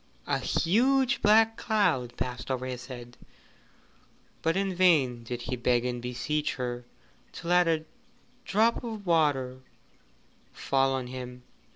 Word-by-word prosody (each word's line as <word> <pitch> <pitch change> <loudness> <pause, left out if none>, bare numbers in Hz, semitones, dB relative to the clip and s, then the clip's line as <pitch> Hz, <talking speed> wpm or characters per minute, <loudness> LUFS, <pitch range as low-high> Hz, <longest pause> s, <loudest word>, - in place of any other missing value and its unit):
A - - 0
huge 260 +8 +2
black 225 +1 +5
cloud 165 - 0
passed 125 +1 -4
over 130 -1 -2
his 125 -1 -6
head, 120 -2 -10 1.2
but 165 +3 +1
in 195 -1 0
vain 150 -10 +3
did 120 +1 -5
he 125 - -3
beg 120 0 +1
and 125 -1 -3
beseech 125 +5 -2
her 120 -1 -4 0.5
to 170 - -8
let 180 0 +4
a 160 -1 0 0.6
drop 225 +4 +2
of 220 -4 -6
water 145 -7 +1 0.9
fall 135 -1 +1
on 130 -1 -2
him. 125 0 -8
135 Hz, 135 wpm, -28 LUFS, 125-185 Hz, 1.2 s, black